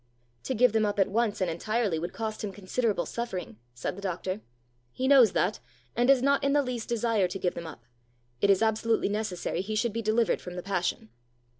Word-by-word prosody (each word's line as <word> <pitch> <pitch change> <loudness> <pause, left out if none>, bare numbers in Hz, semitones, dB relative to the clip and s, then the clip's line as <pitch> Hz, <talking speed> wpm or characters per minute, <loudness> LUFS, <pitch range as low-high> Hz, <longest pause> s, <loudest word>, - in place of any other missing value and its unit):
"To 260 - -1
give 245 0 +4
them 220 -1 +3
up 205 -1 0
at 195 0 +3
once 220 -2 0
and 180 -2 +1
entirely 210 0 -1
would 175 +2 -4
cost 220 -1 -4
him 205 - -3
considerable 205 0 -1
suffering," 190 - -5 0.2
said 120 - -3
the 200 - -9
doctor. 185 +1 -3 0.5
"He 260 - -2
knows 265 -6 +7
that, 200 +4 +1 0.4
and 240 +1 +2
does 270 -2 +5
not 280 +1 +3
in 275 0 +2
the 290 -1 +4
least 245 -3 -4
desire 230 -4 +1
to 185 +2 -5
give 180 -2 -1
them 170 - -6
up. 120 -7 -10 0.6
It 200 - +3
is 195 +2 +4
absolutely 220 0 +1
necessary 205 -4 -2
he 215 +3 -4
should 215 0 0
be 230 - -2
delivered 220 +1 +1
from 180 0 -8
the 180 - -5
passion." 180 - -2
215 Hz, 210 wpm, -28 LUFS, 185-235 Hz, 0.6 s, knows